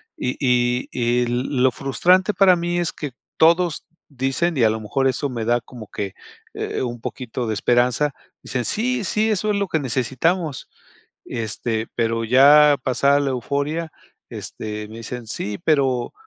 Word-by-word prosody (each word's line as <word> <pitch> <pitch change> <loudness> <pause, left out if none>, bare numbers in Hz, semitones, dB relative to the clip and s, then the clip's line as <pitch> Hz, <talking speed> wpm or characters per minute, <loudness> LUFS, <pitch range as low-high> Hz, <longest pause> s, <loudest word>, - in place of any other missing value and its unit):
y 125 - -3
y 125 -1 +1
y 120 0 +1
l 120 +1 -1 0.2
lo 130 - +5
frustrante 180 - +2
para 190 -2 +5
mí 175 0 -1
es 175 - -1
que, 145 -3 -6 0.3
todos 170 0 +3 0.2
dicen, 135 +5 -1
y 125 - +3
a 110 - +5
lo 110 +1 -2
mejor 135 +5 0
eso 135 +2 -1
me 120 -3 -4
da 120 +1 +2
como 115 -2 -11
que, 100 -2 -4 0.4
eh, - - -3
un 120 -2 -4
poquito 125 -1 -5
de 110 - -1
esperanza, 125 +6 +2 0.3
dicen: 125 -1 -3
"Sí, 245 - 0
sí, 215 +3 0
eso 215 0 0
es - - 0
lo 200 0 0
que 160 - 0
necesitamos". 135 +5 -1 0.6
Este, 110 0 -3
pero 115 -1 0
ya 145 +5 +7
pasada 140 +2 +3
la 140 -1 0
euforia, 140 +6 -2 0.4
este, 105 -1 -6
me 110 +1 -10
dicen: 120 +1 -7
"Sí, 105 -2 -4
pero 135 -5 +1
130 Hz, 165 wpm, -21 LUFS, 120-160 Hz, 0.6 s, ya